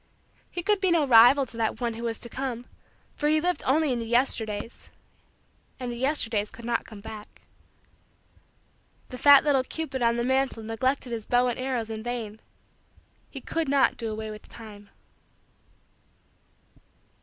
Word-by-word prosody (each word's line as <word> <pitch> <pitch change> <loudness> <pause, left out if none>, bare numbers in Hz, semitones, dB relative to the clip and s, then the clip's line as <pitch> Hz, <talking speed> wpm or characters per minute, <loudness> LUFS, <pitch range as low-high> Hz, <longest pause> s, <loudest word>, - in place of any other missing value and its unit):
He 350 - -5
could 415 0 +1
be 380 - +2
no 335 -4 +3
rival 250 +2 +7
to 235 - -14
that 225 0 -1
one 240 -2 -1
who 225 - -8
was 230 -1 -2
to - - -3
come 245 -1 -5 0.5
for 295 - 0
he 310 0 +3
lived 355 -1 -1
only 290 +1 +2
in 240 - -2
the 230 - -5
Yesterdays 230 -3 -1 0.9
and 250 -1 -4
the - - -5
Yesterdays 235 -5 0
could 235 - -12
not 235 -1 -1
come 210 -3 -11
back. 215 -1 -11 1.7
The 250 - -8
fat 285 0 +8
little 280 -4 +2
cupid 285 -2 -5
on 235 0 +2
the 235 - 0
mantle 260 -2 +1
neglected 250 +4 -1
his 225 -2 -5
bow 245 0 +3
and 240 - -4
arrows 250 -4 -2
in 220 0 -5
vain; 225 -2 -5 0.9
he 270 - -8
could 325 0 -2
not 280 -1 +3
do 230 -2 -4
away 215 0 -5
with 210 0 -11
time. 210 -3 -12
240 Hz, 165 wpm, -26 LUFS, 225-270 Hz, 1.7 s, fat